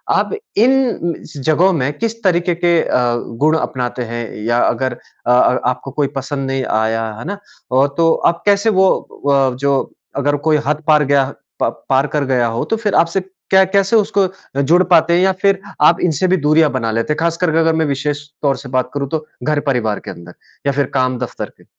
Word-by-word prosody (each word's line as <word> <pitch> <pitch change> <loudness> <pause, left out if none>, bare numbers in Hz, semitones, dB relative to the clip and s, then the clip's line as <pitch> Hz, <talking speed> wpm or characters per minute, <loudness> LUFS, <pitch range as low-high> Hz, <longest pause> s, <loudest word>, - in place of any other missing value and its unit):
आप - - 0 0.2
इन 240 - +2 0.2
जगहों 155 +7 +2
में 130 +3 0
किस 230 0 -3
तरीके 175 -1 +1
के 170 - +4
अ, 120 -1 +1 0.3
गुण 155 +1 +4
अपनाते 125 -3 -3
हैं 120 0 -3 0.2
या 120 +1 +1
अगर 130 -2 0
अ 120 - -6
अ, 125 - +3
आपको 130 +1 -5
कोई 145 0 0
पसंद 135 0 -4
नहीं 135 -1 -1 0.2
आया, 115 0 -1
है - - -8
ना? 200 +3 -4 0.3
और 135 +2 +4
तो 165 -1 +4 0.2
आप 170 - -16
कैसे 205 +2 +3
वो 190 - +5 0.3
व 140 - +3 0.2
अ, - - -9
जो 140 0 +1 0.4
अगर 145 +1 +1
कोई 155 - +4
हद 150 +1 -1
पार 150 -1 +5
गया 140 0 +3 0.4
प - - +3 0.2
पार 135 +2 +3
कर 145 0 -1
गया 125 -2 +1
हो। 115 +1 -2
तो 225 - -1
फिर 215 -2 -1
आपसे 170 +3 +2 0.3
क्या 190 0 +6
कैसे 195 +3 +1
उसको 205 -2 +2 0.4
जुड़ 175 +6 +4
पाते 170 -1 +4
हैं 175 - +3
या 190 0 +4
फिर 195 -1 +3 0.2
आप 170 - +5
इनसे 175 +1 +1
भी - - +4
दूरियाँ 155 +1 +3
बना 115 -4 -2
लेते 115 +7 -1
हैं। - - -7
ख़ास 165 0 0
कर 180 - 0
कर - - +1
करके 165 - +3
अगर 165 0 +3
मैं 160 - +1
विशेष 145 +1 -2 0.2
तौर 140 -2 +1
से 135 - -10
बात 130 -1 -1
करूँ 140 -1 -3
तो 155 -1 -3 0.2
घर 150 -1 +1
परिवार 110 -6 0
के - - -8
अंदर 85 +1 -12 0.3
या - - +3
फिर 140 0 +1
काम 130 -1 +1
दफ़्तर - - -5
में? - - -21
150 Hz, 220 wpm, -17 LUFS, 130-175 Hz, 0.4 s, क्या